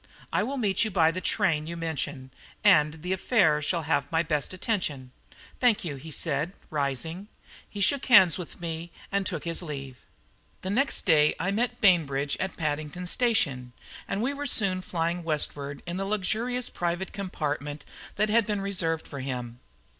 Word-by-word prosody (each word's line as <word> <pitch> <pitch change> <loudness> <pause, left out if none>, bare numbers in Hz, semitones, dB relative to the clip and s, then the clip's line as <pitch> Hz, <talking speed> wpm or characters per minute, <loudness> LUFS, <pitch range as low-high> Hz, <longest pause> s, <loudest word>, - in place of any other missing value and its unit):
"I - - +3
will 265 +6 -2
meet 205 -5 +2
you 220 - 0
by 165 -5 +4
the 185 +2 -4
train 155 -3 +1
you 170 +1 -5
mention, 145 -5 -4 0.3
and 150 +1 +4
the 180 +1 0
affair 185 -7 +3
shall 165 +2 -1
have 145 0 0
my 165 0 +2
best 150 -4 -1
attention." 170 - -2 0.5
"Thank 240 -7 +3
you," 150 -4 -3
he 155 +5 -10
said, 155 +2 0 0.2
rising. 150 +6 -2 0.4
He 205 - -6
shook 275 +7 +2
hands 190 - +8
with 180 -3 -7
me 170 0 -5 0.2
and 200 -1 0
took 165 -6 -3
his 170 0 -1
leave. 140 -6 -6 0.7
The 190 - -2
next 275 +7 +1
day 150 -4 +5
I 185 +4 0
met 240 +3 -1
Bainbridge 145 -8 +3
at 190 0 -3
Paddington 155 +2 -3
Station, 160 - 0 0.3
and 200 +3 -1
we 275 +3 0
were 285 0 -4
soon 195 -7 +3
flying 170 0 -2
westward 145 -3 -2
in 175 +1 -4
the 195 - -1
luxurious 220 +5 -1
private 175 +2 -3
compartment 150 -6 -4 0.3
that 210 +1 +1
had 225 0 +3
been 210 -2 0
reserved 170 -5 -1
for 140 - -7
him. 125 -2 -5
170 Hz, 170 wpm, -27 LUFS, 150-200 Hz, 0.7 s, hands